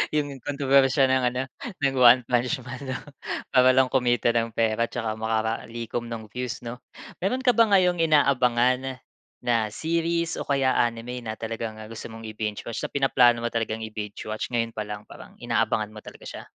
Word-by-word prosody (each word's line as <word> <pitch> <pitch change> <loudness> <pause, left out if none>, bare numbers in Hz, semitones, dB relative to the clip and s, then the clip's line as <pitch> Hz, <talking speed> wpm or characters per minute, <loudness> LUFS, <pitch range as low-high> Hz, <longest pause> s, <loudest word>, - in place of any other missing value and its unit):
yung 150 -1 +1 0.2
kontrobersiya 140 -1 +3
ng 130 -1 +2
ano, 125 - -1 0.4
ng 135 -1 +1
One 125 0 +7
Punch 125 +1 0
Man 125 +2 -8
'no 130 0 -3 0.5
para 130 0 +5
lang 130 0 +4
kumita 120 -2 +2
ng 115 0 0
pera 115 0 +1
tsaka 110 -1 -3
makalikom 115 +1 -2
ng 110 -2 -6
views 125 +1 -5
'no? 120 +1 -6 0.4
Meron 250 +8 0
ka 250 -2 +5
ba 230 -1 +5
ngayong 180 -3 +4
inaabangan 130 -3 +2 0.4
na 110 -3 0
series 170 +1 -1
o - - -4
kaya 135 -2 +2
anime 120 +1 -1
na 110 - -3
talagang 115 0 -5 0.2
gusto 115 - -8
mong 115 0 -8
i-binge-watch 110 +1 -4
na - - -7
pinaplano 125 -4 +4
mo 120 - -1
talagang 115 -1 -2
i-binge-watch 110 +1 -5
ngayon 115 -1 +1
pa 105 -1 -3
lang 105 0 -6
parang - - -12
inaabangan 105 -1 0
mo 110 - -13
talaga - - -12
siya? - - -8
120 Hz, 170 wpm, -25 LUFS, 115-135 Hz, 0.5 s, One